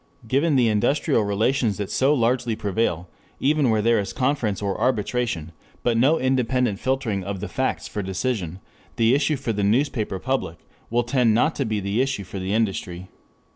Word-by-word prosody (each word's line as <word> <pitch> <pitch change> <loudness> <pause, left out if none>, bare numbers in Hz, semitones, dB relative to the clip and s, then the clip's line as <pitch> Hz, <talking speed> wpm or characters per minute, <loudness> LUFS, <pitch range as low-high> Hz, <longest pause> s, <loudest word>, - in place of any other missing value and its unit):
Given 140 +6 +2
the 125 -3 +4
industrial 115 +4 +2
relations 110 +2 +1
that 100 -2 -4
so 135 +2 +3
largely 120 -2 +1
prevail, 100 -5 -1 0.3
even 145 -1 +2
where 110 -1 +2
there 115 0 +3
is 100 - -4
conference 125 -7 0
or 100 -1 -3
arbitration, 115 -8 -1 0.3
but 120 - +2
no 135 +8 +3
independent 125 -4 +1
filtering 130 -7 -1
of 100 0 -4
the - - -4
facts - - -2
for 105 - -4
decision, 95 -2 -3 0.4
the 115 +1 +3
issue 150 +2 +2
for 130 -4 -3
the 100 -1 -1
newspaper 110 -2 +1
public 120 -6 -2 0.3
will 120 +1 +1
tend 120 -2 +2
not 155 +7 +3
to 140 - 0
be 110 -2 -1
the 100 +4 0
issue 130 -6 -1
for 95 +1 -7
the 95 +1 -3
industry. 95 -4 -2
115 Hz, 175 wpm, -23 LUFS, 100-130 Hz, 0.4 s, the